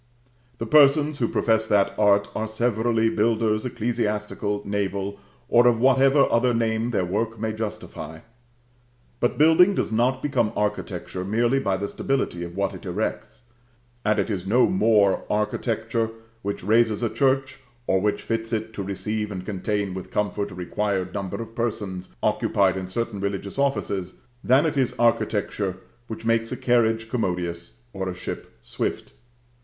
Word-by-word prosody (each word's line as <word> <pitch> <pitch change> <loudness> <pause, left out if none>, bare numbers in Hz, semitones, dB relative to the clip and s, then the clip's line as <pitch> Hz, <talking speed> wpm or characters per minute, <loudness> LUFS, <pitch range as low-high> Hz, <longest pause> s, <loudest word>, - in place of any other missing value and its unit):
The 115 - -3
persons 145 +2 +5
who 120 - +2
profess 110 -1 +1
that 100 -2 +3
art, 100 -1 +3
are 110 - -2
severally 115 0 +1
builders, 110 +1 +1
ecclesiastical, 105 -3 -2
naval, 100 0 -2 0.3
or 120 +1 +5
of 120 -2 +3
whatever 135 +2 +5
other 120 +1 +3
name 115 0 0
their 100 -6 0
work 110 +4 -2
may 110 0 -2
justify; 80 -7 -6 1.0
but 120 - 0
building 165 +6 +6
does - - -1
not 125 +4 +1
become 125 -7 +1
architecture 105 -3 -3
merely 120 +7 +1
by 100 -7 0
the 100 +1 -3
stability 100 -8 -2
of 85 0 -7
what 100 0 -1
it - - -10
erects; 105 +6 -4 0.6
and 105 0 +2
it 110 - 0
is 95 -2 -3
no 120 +5 +5
more 110 - +3
architecture 110 +1 -1 0.3
which 100 -2 -4
raises 110 +2 +3
a 115 - +1
church, 135 0 +1 0.3
or 95 -4 +2
which 105 +1 0
fits 115 0 -2
it 110 -1 -2
to 105 - -4
receive 105 +2 -3
and 95 -2 -6
contain 100 0 -2
with 95 -1 -7
comfort 105 0 -1
a - - -10
required 95 0 -2
number 100 -1 -4
of 115 -1 -7
persons 105 -6 -4
occupied 95 -2 +2
in 95 -1 -4
certain 110 +1 -3
religious 100 +3 -3
offices, 100 -9 -1 0.3
than 135 +5 +4
it 155 -2 -1
is 130 -3 +1
architecture 105 -4 0 0.3
which 110 0 -7
makes 115 0 +1
a 125 - -3
carriage 115 -2 +2
commodious 90 -7 -3 0.2
or 95 -1 -3
a 90 - -5
ship - - -7
swift. - - -4
110 Hz, 155 wpm, -24 LUFS, 100-120 Hz, 1.0 s, building